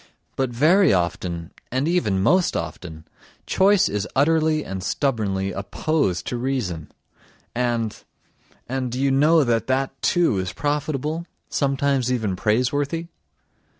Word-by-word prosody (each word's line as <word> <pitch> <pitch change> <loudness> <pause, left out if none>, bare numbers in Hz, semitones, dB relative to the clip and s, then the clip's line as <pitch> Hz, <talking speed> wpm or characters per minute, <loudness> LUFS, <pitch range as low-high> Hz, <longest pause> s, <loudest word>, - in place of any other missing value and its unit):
But 135 -1 0
very 160 +11 +4
often, 85 -1 -1 0.2
and 130 +4 0
even 105 - +1
most 180 - +3
often, 80 0 -6 0.4
choice 195 0 +4
is 105 0 -2
utterly 155 +2 +2
and 95 -1 -5
stubbornly 100 -6 -1
opposed 100 - -1
to 120 - -3
reason... 120 - -3 0.6
and... 120 -3 -1 0.7
and... 130 -1 -2
do 125 - -3
you 135 0 +2
know 150 +4 +4
that 115 -3 0
that, 130 +1 +1
too, 170 - +2
is 95 +2 -3
profitable, 150 +2 -2 0.2
sometimes 135 -2 +1
even 110 -7 -1
praiseworthy? 140 - 0
130 Hz, 120 wpm, -23 LUFS, 100-150 Hz, 0.7 s, very